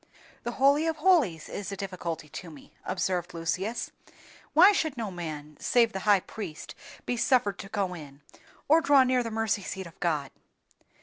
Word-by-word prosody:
"The 240 Hz, -1 st, -4 dB
Holy 280 Hz, +5 st, +3 dB
of 325 Hz, -, 0 dB
holies 300 Hz, -, +3 dB
is 200 Hz, -1 st, -5 dB
a 195 Hz, -, -5 dB
difficulty 175 Hz, -5 st, -5 dB
to 175 Hz, +3 st, -8 dB
me," 150 Hz, -3 st, -15 dB
observed 180 Hz, -2 st, -2 dB
Lucius; 185 Hz, +7 st, -2 dB, 0.6 s
"why 355 Hz, +6 st, +8 dB
should 315 Hz, -9 st, -1 dB
no 220 Hz, -4 st, -3 dB
man, 155 Hz, -4 st, -7 dB
save 230 Hz, -2 st, +3 dB
the 190 Hz, -, -3 dB
high 200 Hz, -2 st, +6 dB
priest, 180 Hz, -8 st, -8 dB, 0.3 s
be 245 Hz, -, -1 dB
suffered 240 Hz, -5 st, +2 dB
to 195 Hz, -, -8 dB
go 195 Hz, -3 st, -1 dB
in, 145 Hz, -4 st, -11 dB, 0.5 s
or 320 Hz, +3 st, +5 dB
draw 285 Hz, -3 st, +6 dB
near 255 Hz, 0 st, +2 dB
the 230 Hz, -, -3 dB
mercy 220 Hz, -2 st, 0 dB
seat 190 Hz, 0 st, -6 dB
of 170 Hz, -, -14 dB
God?" 150 Hz, -5 st, -1 dB
200 Hz, 175 wpm, -28 LUFS, 170-250 Hz, 0.6 s, why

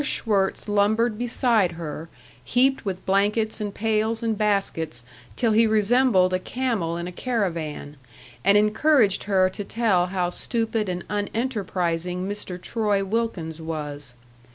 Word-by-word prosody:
Schwirtz 205 Hz, -9 st, 0 dB
lumbered 210 Hz, +2 st, +2 dB
beside 235 Hz, -6 st, +1 dB
her, 160 Hz, -1 st, -6 dB, 0.3 s
heaped 265 Hz, -, +2 dB
with 190 Hz, -2 st, -4 dB
blankets 210 Hz, +3 st, +1 dB
and 205 Hz, -1 st, -2 dB
pails 220 Hz, +2 st, 0 dB
and 225 Hz, -1 st, 0 dB
baskets 195 Hz, -, -1 dB, 0.3 s
till 230 Hz, -3 st, +1 dB
he 225 Hz, +1 st, +4 dB
resembled 215 Hz, -3 st, +3 dB
a 185 Hz, -, +1 dB
camel 215 Hz, -8 st, -2 dB
in 170 Hz, -, -4 dB
a 180 Hz, -, -5 dB
caravan, 170 Hz, -, -3 dB, 0.5 s
and 200 Hz, +2 st, +6 dB
encouraged 215 Hz, 0 st, +3 dB
her 190 Hz, -2 st, +3 dB
to 205 Hz, -, -5 dB
tell 200 Hz, -5 st, +1 dB
how 180 Hz, -1 st, -1 dB
stupid 225 Hz, -1 st, -1 dB
and 180 Hz, -1 st, -3 dB
unenterprising 185 Hz, -5 st, -2 dB
Mr. 200 Hz, -3 st, -5 dB
Troy 205 Hz, -1 st, 0 dB
Wilkins 190 Hz, -7 st, -2 dB
was. 145 Hz, -5 st, -6 dB
205 Hz, 130 wpm, -24 LUFS, 180-225 Hz, 0.5 s, and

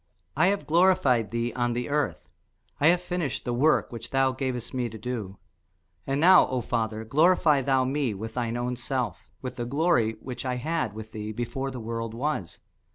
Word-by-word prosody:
I 160 Hz, +6 st, +4 dB
have 200 Hz, +1 st, 0 dB
glorified 165 Hz, -, +3 dB
thee 115 Hz, +1 st, -2 dB
on 120 Hz, -1 st, 0 dB
the 120 Hz, +1 st, -2 dB
earth: 145 Hz, 0 st, -1 dB, 0.5 s
I 145 Hz, -, +4 dB
have 175 Hz, +1 st, +4 dB
finished 175 Hz, -7 st, -3 dB
the 120 Hz, -, -1 dB
work 150 Hz, +6 st, +2 dB
which 115 Hz, 0 st, -7 dB
thou 135 Hz, 0 st, +2 dB
gavest 130 Hz, -2 st, -4 dB
me 125 Hz, -2 st, -1 dB
to 110 Hz, -, -9 dB
do. 105 Hz, -4 st, -5 dB, 0.7 s
And 135 Hz, +1 st, 0 dB
now, 185 Hz, +4 st, +7 dB
O 130 Hz, -, -1 dB
Father, 110 Hz, -2 st, -2 dB
glorify 155 Hz, +2 st, +4 dB
thou 130 Hz, 0 st, +2 dB
me 135 Hz, -4 st, -1 dB
with 110 Hz, +3 st, -6 dB
thine 120 Hz, -1 st, -2 dB
own 125 Hz, +1 st, -2 dB
self 125 Hz, 0 st, -3 dB
with 130 Hz, -, -5 dB
the 120 Hz, -, -2 dB
glory 135 Hz, -4 st, +2 dB
which 125 Hz, -1 st, -6 dB
I 130 Hz, -1 st, -1 dB
had 140 Hz, -, -2 dB
with 110 Hz, 0 st, -9 dB
thee 105 Hz, 0 st, -5 dB
before 120 Hz, +4 st, -3 dB
the 130 Hz, -2 st, -6 dB
world 115 Hz, 0 st, -4 dB
was. 130 Hz, -, -3 dB
125 Hz, 190 wpm, -27 LUFS, 115-145 Hz, 0.7 s, now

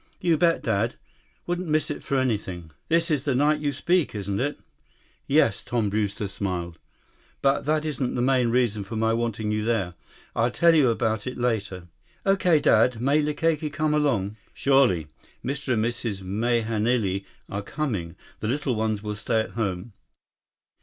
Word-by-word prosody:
"You 170 Hz, -2 st, +3 dB
bet, 165 Hz, +1 st, +2 dB
Dad. 110 Hz, +1 st, 0 dB, 0.5 s
Wouldn't 175 Hz, +1 st, -2 dB
miss 155 Hz, 0 st, +1 dB
it -, -, -5 dB
for 140 Hz, -, -1 dB
anything. 95 Hz, -10 st, -2 dB, 0.2 s
This 165 Hz, +1 st, +2 dB
is 145 Hz, -3 st, +1 dB
the 140 Hz, -3 st, 0 dB
night 150 Hz, +3 st, +3 dB
you 145 Hz, -1 st, 0 dB
speak, 160 Hz, -1 st, +1 dB
isn't 100 Hz, -1 st, -2 dB
it?" 145 Hz, +3 st, -1 dB, 0.7 s
"Yes." 135 Hz, -8 st, +3 dB
Tom 115 Hz, -4 st, -1 dB
Brewster 105 Hz, -1 st, -1 dB
smiled. 90 Hz, -4 st, -4 dB, 0.6 s
"But 135 Hz, 0 st, +2 dB
that 155 Hz, +1 st, +1 dB
isn't 140 Hz, -4 st, -2 dB
the 120 Hz, -, 0 dB
main 130 Hz, -2 st, +3 dB
reason 115 Hz, -4 st, +1 dB
for 100 Hz, +4 st, -7 dB
my 110 Hz, +1 st, +2 dB
wanting 115 Hz, -2 st, -1 dB
you 105 Hz, 0 st, 0 dB
there. 110 Hz, -6 st, 0 dB, 0.4 s
I'll 115 Hz, +2 st, +2 dB
tell 170 Hz, +6 st, +4 dB
you 145 Hz, -6 st, +5 dB
about 110 Hz, -1 st, 0 dB
it 130 Hz, -, -4 dB
later." 100 Hz, -7 st, -2 dB, 0.4 s
"Okay, 185 Hz, -5 st, +4 dB
Dad. 115 Hz, -3 st, +4 dB
May 140 Hz, +5 st, +3 dB
Likake 150 Hz, +1 st, 0 dB
come 155 Hz, 0 st, 0 dB
along?" 115 Hz, -9 st, +1 dB, 0.2 s
"Surely. 135 Hz, -, +3 dB, 0.4 s
Mr. 140 Hz, 0 st, -1 dB
and 110 Hz, -1 st, +1 dB
Mrs. 115 Hz, -4 st, -3 dB
Mahenili 110 Hz, -1 st, 0 dB, 0.2 s
are 100 Hz, -, -4 dB
coming. 100 Hz, -, -3 dB, 0.2 s
The 110 Hz, -, -3 dB
little 135 Hz, +2 st, 0 dB
ones 110 Hz, -2 st, -1 dB
will 105 Hz, 0 st, -3 dB
stay 105 Hz, +2 st, 0 dB
at 110 Hz, -, -6 dB
home." 100 Hz, 0 st, -3 dB
120 Hz, 165 wpm, -25 LUFS, 105-145 Hz, 0.7 s, you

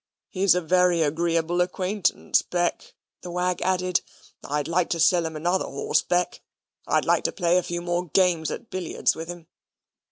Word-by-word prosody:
"He's 190 Hz, -2 st, +3 dB
a 180 Hz, -, +1 dB
very 180 Hz, 0 st, +3 dB
agreeable 165 Hz, +2 st, 0 dB
acquaintance, 185 Hz, +2 st, 0 dB
Beck," 175 Hz, -1 st, -2 dB, 0.3 s
the 180 Hz, -, -8 dB
wag 180 Hz, 0 st, -1 dB
added. 185 Hz, -2 st, +1 dB, 0.4 s
"I'd 145 Hz, 0 st, -2 dB
like 170 Hz, +1 st, +1 dB
to 170 Hz, -, -1 dB
sell 170 Hz, 0 st, +3 dB
him 160 Hz, -, -8 dB
another 175 Hz, +5 st, 0 dB
horse, 140 Hz, +2 st, 0 dB
Beck. 180 Hz, +3 st, -1 dB, 0.5 s
I'd -, -, +1 dB
like -, -, +2 dB
to -, -, +1 dB
play 175 Hz, -1 st, +1 dB
a -, -, -1 dB
few 175 Hz, 0 st, -4 dB
more 175 Hz, +1 st, -1 dB
games 170 Hz, -2 st, +2 dB
at -, -, -7 dB
billiards 185 Hz, -3 st, 0 dB
with 165 Hz, +1 st, -7 dB
him. 175 Hz, -1 st, -8 dB
175 Hz, 170 wpm, -25 LUFS, 165-180 Hz, 0.5 s, He's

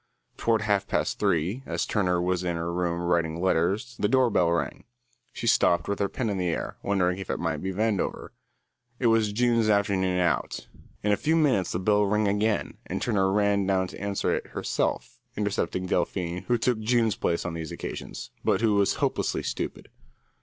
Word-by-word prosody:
Toward 110 Hz, -2 st, +1 dB
half 100 Hz, -2 st, +1 dB
past -, -, -1 dB
three, 90 Hz, -, +1 dB
as -, -, -1 dB
Turner 90 Hz, -4 st, +1 dB
was 90 Hz, 0 st, 0 dB
in 90 Hz, -1 st, -1 dB
her 85 Hz, +1 st, -3 dB
room 85 Hz, -1 st, -1 dB
writing 85 Hz, -2 st, 0 dB
letters, 95 Hz, +6 st, 0 dB
the 105 Hz, -, +2 dB
door 130 Hz, +1 st, +3 dB
bell 90 Hz, -4 st, +3 dB
rang. 85 Hz, -, -2 dB, 0.5 s
She -, -, -6 dB
stopped, 85 Hz, 0 st, +3 dB
with 100 Hz, -, -2 dB
her 100 Hz, -1 st, +1 dB
pen 115 Hz, -5 st, -2 dB
in 95 Hz, -, -2 dB
the 90 Hz, -, 0 dB
air, 85 Hz, -, -3 dB
wondering 95 Hz, -2 st, +1 dB
if 95 Hz, -, -7 dB
it -, -, -1 dB
might 80 Hz, -2 st, -1 dB
be 95 Hz, -, -2 dB
Vandover. 105 Hz, +1 st, -1 dB, 0.7 s
It 125 Hz, -, -3 dB
was 110 Hz, -2 st, +2 dB
June's 115 Hz, 0 st, +2 dB
afternoon 95 Hz, -3 st, +2 dB
out. 85 Hz, -2 st, 0 dB, 0.4 s
In 105 Hz, -, +2 dB
a -, -, +5 dB
few 160 Hz, +2 st, +1 dB
minutes 135 Hz, -, +2 dB
the -, -, -1 dB
bell 105 Hz, +3 st, +3 dB
rang 105 Hz, +1 st, +2 dB
again, 105 Hz, +2 st, 0 dB
and -, -, -3 dB
Turner 95 Hz, -5 st, +1 dB
ran 100 Hz, -1 st, +2 dB
down 95 Hz, -1 st, +2 dB
to -, -, -10 dB
answer 100 Hz, -1 st, 0 dB
it -, -, -3 dB
herself, -, -, -2 dB, 0.2 s
intercepting 100 Hz, -2 st, -1 dB
Delphine, 90 Hz, 0 st, -1 dB
who 120 Hz, -, +3 dB
took 120 Hz, 0 st, +1 dB
June's 115 Hz, -1 st, +2 dB
place 85 Hz, -, -1 dB
on 90 Hz, -, -3 dB
these 80 Hz, -2 st, -5 dB
occasions, -, -, -6 dB
but -, -, +2 dB
who 110 Hz, -2 st, +3 dB
was 100 Hz, -1 st, +2 dB
hopelessly -, -, -1 dB
stupid. -, -, -4 dB
100 Hz, 190 wpm, -27 LUFS, 90-110 Hz, 0.7 s, a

